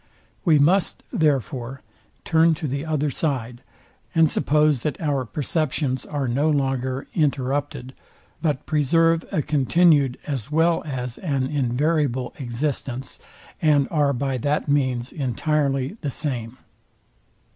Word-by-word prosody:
We 165 -5 +5
must, 175 +7 +2
therefore, 135 -3 -1 0.4
turn 165 0 +4
to 155 -1 -4
the 140 +4 -3
other 150 -2 0
side, 125 -5 -2 0.5
and 165 -1 +6
suppose 150 -2 +2
that 150 0 -3
our 145 -5 -1
perceptions 140 - -1
are 145 -3 -2
no 140 +6 +1
longer 135 -2 -1
interrupted, 140 -2 -1 0.5
but 150 -5 -1
preserve 165 +2 +2
a 155 - 0
continued 145 -1 +3
as 135 -5 -4
well 165 +2 +2
as 125 -4 -4
an 140 -7 -1
invariable 140 -1 0
existence, 130 0 -3 0.4
and 145 -4 +3
are 145 -3 +2
by 135 0 -2
that 145 +6 0
means 130 -4 0
entirely 140 - -1
the 145 - -2
same. 125 -4 -4
140 Hz, 120 wpm, -23 LUFS, 130-155 Hz, 0.5 s, and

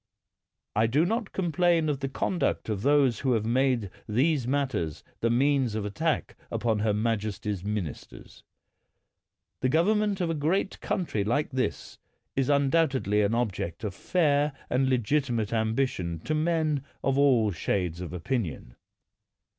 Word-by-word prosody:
I 110 +2 +3
do 145 +8 +3
not 225 +2 -1
complain 175 -2 +2
of 145 -3 -1
the 135 -1 -3
conduct 175 -2 -1
of 105 -3 -2
those 140 -3 +3
who 130 -2 +1
have 110 -2 0
made 120 -4 +1 0.2
these 130 +3 +2
matters 130 - -1 0.2
the 115 - +1
means 130 -1 +2
of 110 -2 -2
at> 105 - -5
tack 160 +3 -1
upon 115 -1 0
her 105 0 +2
majesty's 105 -3 -2
ministers. 100 -8 -6 1.2
The 130 - +2
govern 175 +9 +3
ment 205 -2 0
of 175 -2 0
a - - 0
great 165 +6 0
country 160 - -1
like 145 +9 0
this 130 -1 -3 0.4
is 135 0 +1
undoubtedly 140 -7 +2
an 105 +2 +1
object 95 -7 -2
of 105 -3 -3
fair 150 - +1 0.2
and 130 +1 +2
legitimate 120 -3 0
ambition 110 -6 0
to 155 - -2
men 155 -3 +1 0.2
of 135 0 +1
all 125 -7 +4
shades 90 0 -2
of 90 - -5
opinion. 90 - -3
130 Hz, 145 wpm, -27 LUFS, 105-150 Hz, 1.2 s, all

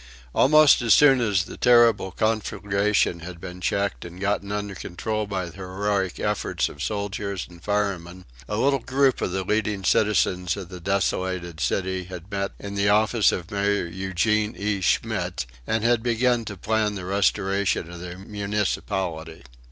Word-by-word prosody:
Almost 150 0 +6
as 115 -2 +5
soon 135 -4 +6
as 100 -5 +2
the - - -10
terrible 120 -5 +5
conflagration 105 -3 0
had 85 +1 -9
been 90 0 -8
checked 100 +2 -1
and 85 +1 -10
gotten 100 0 -1
under 105 -1 -3
control 105 +4 -4
by 95 -3 -2
the 85 +1 -11
heroic 95 0 -2
efforts - - -1
of - - -12
the - - -9
soldiers 100 -1 -3
and 85 -1 -15
firemen, 95 -4 -2 0.2
a 105 - -1
little 135 +3 +2
group 135 +1 +1
of - - -1
the 95 +1 -2
leading 105 0 -1
citizens 95 -4 +2
of 95 -3 -7
the 90 -1 -8
desolated 95 -2 -1
city 95 +2 -1
had 90 +1 -10
met 100 0 -2
in 100 0 -7
the 100 0 +1
office 110 +1 +4
of 90 +3 -5
Mayor 100 -1 +1
Eugene 95 +5 0
E. 100 -1 -1
Schmitz 85 - 0 0.2
and 110 -1 0
had 120 -1 +3
begun 120 0 +1
to 105 -2 -6
plan 105 +2 0
the 95 -2 -6
restoration 100 -2 0
of 90 - -9
their 90 0 -7
municipality. 95 - -3
100 Hz, 165 wpm, -24 LUFS, 90-105 Hz, 0.2 s, Almost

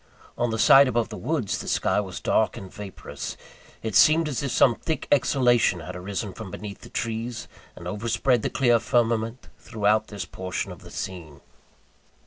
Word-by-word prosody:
On 120 - 0
the 110 - -2
side 135 +4 +7
above 120 -2 0
the 110 - -7
woods, 130 -3 -2
the - - -7
sky - - +1
was 95 -3 -5
dark 110 0 +1
and 95 -5 -9
vaporous. 105 -2 -7 0.5
It 110 -2 -3
seemed 155 - +6
as 145 -3 -2
if 140 - -2
some 125 0 +4
thick 160 +6 -4
exhalation 125 -7 +3
had 80 +3 -7
arisen 95 +2 -4
from 110 -1 -8
beneath 100 +1 -8
the - - -12
trees, 115 0 -4 0.3
and - - -9
overspread 115 +3 +1
the - - -1
clear 120 -3 +3
firmament 115 0 0
throughout 110 -1 +1
this 100 -4 -6
portion 95 +1 -4
of - - -10
the - - -12
scene. 85 -6 -7
110 Hz, 175 wpm, -25 LUFS, 100-120 Hz, 0.5 s, side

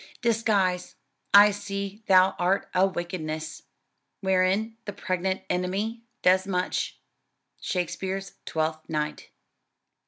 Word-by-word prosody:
"Disguise, 205 -6 +1 0.4
I 205 +1 +9
see 200 0 -5
thou 185 0 +6
art 180 +3 +1
a 185 +1 +4
wickedness, 160 -4 -4 0.6
Wherein 190 +3 +2
the 205 - -5
pregnant 185 +1 -2
enemy 195 +6 -1 0.2
does 185 +1 +4
much." 180 -1 -1 0.6
SHAKESPEARE'S 190 +2 -3
TWELFTH 155 0 -2
NIGHT. 150 -1 -3
185 Hz, 95 wpm, -26 LUFS, 180-200 Hz, 0.6 s, I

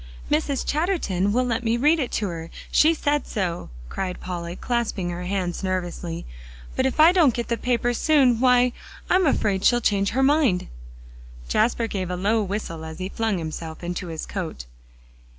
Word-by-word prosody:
"Mrs. 295 -3 0
Chatterton 290 - 0
will 250 +4 +2
let 240 0 -1
me 230 0 +1
read 300 +6 +4
it 260 - -1
to 210 - 0
her; 165 -1 -6 0.2
she 320 +2 +5
said 295 -1 0
so," 180 -5 -3 0.2
cried 185 - -4
Polly, 175 -1 -5
clasping 215 -6 -2
her 175 +1 -5
hands 185 -1 -2
nervously, 175 -2 -3 0.5
"but 260 - +2
if 265 - -4
I 320 +2 +8
don't 325 -10 +4
get 235 - -3
the 235 - +2
paper 245 0 0
soon, 260 -3 +3
why, 250 -1 +4 0.4
I'm 370 -2 +4
afraid 200 -8 +1
she'll 240 - +5
change 200 -4 +1
her 265 +3 +1
mind." 270 -10 +3 0.8
Jasper 230 +1 +2
gave 190 -5 -3
a 180 - -2
low 210 +5 +1
whistle 195 -5 -4
as 160 0 -7
he 185 +1 -4
flung 220 -2 -1
himself 160 0 -6
into 175 +1 -4
his 160 -2 -5
coat. 165 - -5
215 Hz, 175 wpm, -24 LUFS, 180-255 Hz, 0.8 s, I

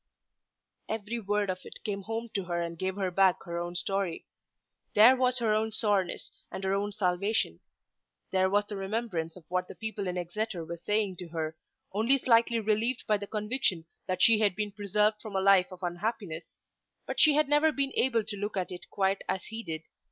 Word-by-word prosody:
Every 220 +2 -3
word 205 -2 0
of 185 - -5
it - - -10
came 200 -2 -3
home 225 +3 -4
to 195 -3 -2
her 175 -1 -2
and 170 0 -3
gave 185 +3 -2
her 190 -2 -1
back 190 0 +3
her 170 0 -4
own 175 0 -4
story. 195 -2 -2 0.7
There 230 +5 +8
was 255 -1 +2
her 225 -3 +2
own 220 +1 +1
soreness, 205 -4 0 0.2
and 190 - -6
her 190 0 +1
own 200 +1 0
salvation. 190 - 0 0.7
There 190 0 +3
was 205 +1 +2
the 205 - -5
remembrance 195 -5 -3
of 180 - -13
what 180 0 -1
the - - -10
people 220 -3 -4
in 180 0 -2
Exeter 180 0 -3
were 170 +1 -6
saying 205 0 0
of 175 - -7
her, 160 -1 -3 0.4
only 230 +7 +4
slightly 235 -2 +3
relieved 220 +3 +1
by 210 - +3
the 200 0 -7
conviction 210 -5 0 0.2
that 185 0 +1
she 225 -2 +6
had 205 -4 +2
been 210 0 -2
preserved 210 +1 +1
from 215 -3 -7
a - - +3
life 190 -1 +5
of 185 0 -11
unhappiness. 175 -1 -4 0.5
But - - -3
she 305 -2 +7
had 305 -1 +3
never 295 +2 +4
been 275 -1 0
able 235 -3 +2
to 210 0 -4
look 205 0 -3
at 185 -1 -2
it 180 - -9
quite 195 0 +1
as 190 0 -1
he 225 +1 -5
did. 160 -6 -5
200 Hz, 205 wpm, -29 LUFS, 185-220 Hz, 0.7 s, There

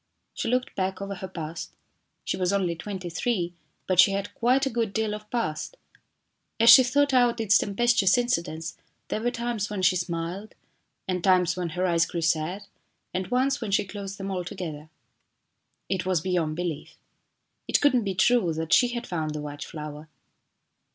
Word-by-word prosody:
She - - -3
looked 250 +2 0
back 190 0 -2
over 200 0 -4
her 190 0 -6
past 165 -2 -6 0.5
she - - -2
was 180 0 0
only 185 -4 0
twenty 190 +1 -6
three, 175 0 -1 0.3
but 185 -2 0
she 195 +2 +7
had 200 +1 -3
quite 255 +4 +2
a - - 0
good 225 -3 -1
deal 220 -1 0
of 210 0 -8
past. 230 - -3 0.8
As 230 +1 +8
she 265 - +11
thought 280 +3 +2
out 245 -2 +3
its 220 -2 +3
tempestuous 210 0 +3
incidents 170 -9 -1 0.3
there 215 - -2
were 240 - +1
times 235 -4 -3
when 205 -3 -3
she 185 - +4
smiled, 175 +3 -4 0.5
and 180 -2 -2
times 180 -2 +3
when 180 -2 -3
her 185 - +1
eyes 170 -2 +2
grew 170 - -4
sad, 165 +4 0 0.5
and 185 +1 -2
once 265 +3 +1
when 225 - -3
she 200 +1 +2
closed 195 0 -7
them 195 0 -5
altogether. 175 -4 -5 1.0
It 190 -2 -1
was 185 -2 +1
beyond 170 -3 -1
belief. 170 -3 -4 0.7
It - - +3
could 290 -2 +4
not 245 -3 +2
be 195 -2 -2
true 235 -4 +3
that 160 +2 -2
she 245 - +6
had 240 - -4
found 155 -3 -3
the 150 - -4
white 145 0 -6
flower. 150 0 -8
190 Hz, 180 wpm, -26 LUFS, 170-230 Hz, 1.0 s, she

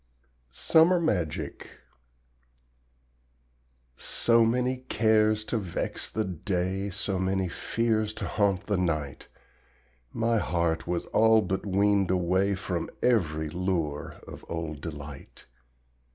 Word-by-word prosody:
SUMMER 165 - +4
MAGIC 90 - -2 2.3
So 115 0 +3
many 125 +3 +1
cares 110 -3 +2
to 115 - -1
vex 90 -5 -4
the 110 +1 -2
day, 95 +2 -2
So 95 -1 -2
many 95 0 0
fears 110 +3 -1
to - - -4
haunt 100 -2 0
the 100 -2 0
night, 75 -6 -2 0.8
My 115 0 +1
heart 85 -4 -1
was 85 -1 -1
all 110 0 +5
but 95 +2 -3
weaned 100 0 +2
away 95 +2 +2
From 90 -3 -3
every 80 -10 +1
lure 85 -5 -2
of - - -10
old 80 -3 -4
delight. 75 -3 -9
95 Hz, 110 wpm, -27 LUFS, 85-110 Hz, 2.3 s, all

